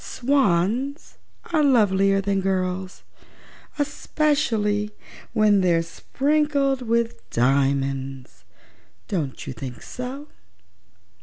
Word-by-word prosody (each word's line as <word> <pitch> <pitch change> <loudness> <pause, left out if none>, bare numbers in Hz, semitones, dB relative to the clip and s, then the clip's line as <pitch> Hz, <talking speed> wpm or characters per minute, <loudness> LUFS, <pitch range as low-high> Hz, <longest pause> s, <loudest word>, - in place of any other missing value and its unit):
Swans 255 - 0 0.3
are 310 -2 +4
lovelier 195 -7 +3
than 195 0 0
girls, 185 0 -2 0.7
especially 280 -8 0 0.4
when 210 -3 +4
they're 170 -2 +3
sprinkled 275 - 0
with 235 -1 -1
diamonds. 135 +1 0 0.6
Don't 150 -7 -3
you 135 - -5
think 125 -1 -8
so?" 260 +4 -7
205 Hz, 80 wpm, -23 LUFS, 170-270 Hz, 0.7 s, are